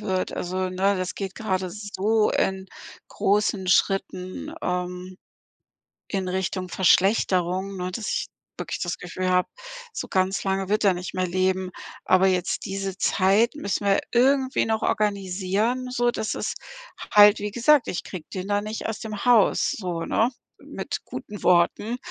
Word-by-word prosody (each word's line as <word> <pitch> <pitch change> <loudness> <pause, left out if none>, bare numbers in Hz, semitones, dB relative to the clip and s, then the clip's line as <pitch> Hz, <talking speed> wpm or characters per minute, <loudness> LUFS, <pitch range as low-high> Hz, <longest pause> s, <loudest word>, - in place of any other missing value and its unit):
wird. 190 -3 -2
Also, 180 +1 -4
ne, 195 +2 +1
das 185 0 -3
geht 195 -1 -5
gerade 190 -5 -2
so 210 +1 0
in 190 0 0 0.4
großen 200 -1 0
Schritten, 185 0 0
ähm, 180 +1 -3 0.9
in 190 -2 -2
Richtung 185 0 -2
Verschlechterung, 190 0 +2
ne, 180 0 -3
dass 215 +3 -5
ich - - -1 0.3
wirklich - - -4
das 175 - -2
Gefühl 185 +1 -4
habe, 180 0 +2 0.4
so - - -5
ganz 190 +1 0
lange 195 -1 -1
wird 210 +1 +1
er 195 - +5
nicht 180 +1 -6
mehr 185 0 0
leben. 185 +1 0 0.4
Aber 185 +1 +5
jetzt 185 -2 0
diese 195 -1 -4
Zeit 200 +5 +2
müssen 205 -8 -3
wir 195 0 +4
irgendwie 265 +2 +3
noch 220 -1 0
organisieren, 205 +4 0
sodass 240 -3 0
es - - -3 0.6
halt 205 0 +7
wie 205 0 -3
gesagt, 250 +5 +3
ich 175 - -3
kriege 175 -5 -8
den 190 +1 -5
da 205 0 +1
nicht 215 +1 -5
aus 225 - -3
dem 215 -3 -5
Haus 235 -5 +4
so, 175 -5 -3
ne, 230 +3 +2 0.3
mit - - -5
guten 205 -1 -8
Worten 180 +6 +2
195 Hz, 150 wpm, -24 LUFS, 185-210 Hz, 0.9 s, halt